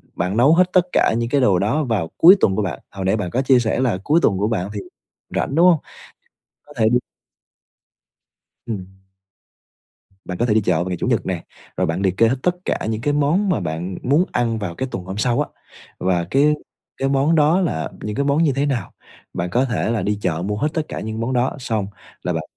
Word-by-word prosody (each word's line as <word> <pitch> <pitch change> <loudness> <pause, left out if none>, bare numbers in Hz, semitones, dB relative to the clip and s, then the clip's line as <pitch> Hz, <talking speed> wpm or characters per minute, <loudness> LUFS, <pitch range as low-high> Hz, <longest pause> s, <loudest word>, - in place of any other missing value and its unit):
bạn 90 +5 -1
nấu 135 +6 +5
hết 180 +1 +3
tất 180 -2 +4
cả - - +3
những 115 0 -1
cái 140 +2 +2
đồ 100 -8 +3
đó 115 +11 +1
vào 110 - -1
cuối 180 +4 +9
tuần 95 - +2
của 105 - 0
bạn, 90 -7 -3
hồi 95 -1 -5
nãy 95 - +2
bạn 95 -4 -3
có 130 - +1
chia 130 -1 +4
sẻ 115 0 -1
là 125 -7 +1
cuối 155 +8 +3
tuần 100 - +3
của 100 +2 0
bạn 100 -4 -2
thì 105 - -4 0.6
rảnh, 135 - -1
đúng 170 +2 +5
hông? 170 -4 +5 0.9
Có 145 - -15
thể 110 -2 +3
đi 120 - +4 1.7
Ừm. 100 -5 -4 1.4
Bạn 90 - -5
có 120 - +1
thể 115 - +2
đi 110 - +3
chợ 90 -2 +1
vào 85 - -1
ngày 90 - -2
Chủ - - -2
nhật 120 -4 +1
nè, 90 -3 -3 0.3
rồi - - +1
bạn 80 +4 -2
liệt 95 -1 0
kê 115 - +5
hết 125 - +1
tất 180 0 +2
cả - - -1
những 110 0 -2
cái 145 +4 0
món 150 +8 +2
mà 180 - +1
bạn 85 +1 -4
muốn 145 +8 +3
ăn 115 -2 0
vào 90 -5 -4
cái 130 - -3
tuần 90 - -5
hôm 95 +2 -6
sau 120 +2 +1
á, - - -3 0.5
và 90 -2 0
cái 145 +3 +4 0.4
cái 135 - 0
món 140 +4 +2
đó 155 +4 +4
là 80 - -1
những 105 0 -4
cái 140 - 0
món 145 +3 +2
như 155 - +3
thế 140 +1 +1
nào. 125 -9 -2 0.4
Bạn 90 +1 -3
có 125 +6 +2
thể 115 -2 -1
là 115 - 0
đi 105 0 -1
chợ 85 -4 -1
mua 105 +1 -2
hết 145 - +1
tất 160 - 0
cả - - -5
những 110 +1 -5
món 115 +3 -2
đó, 125 0 +1
xong 110 -6 -2 0.3
là - - -2
bạn - - -2
115 Hz, 240 wpm, -20 LUFS, 95-140 Hz, 1.7 s, cuối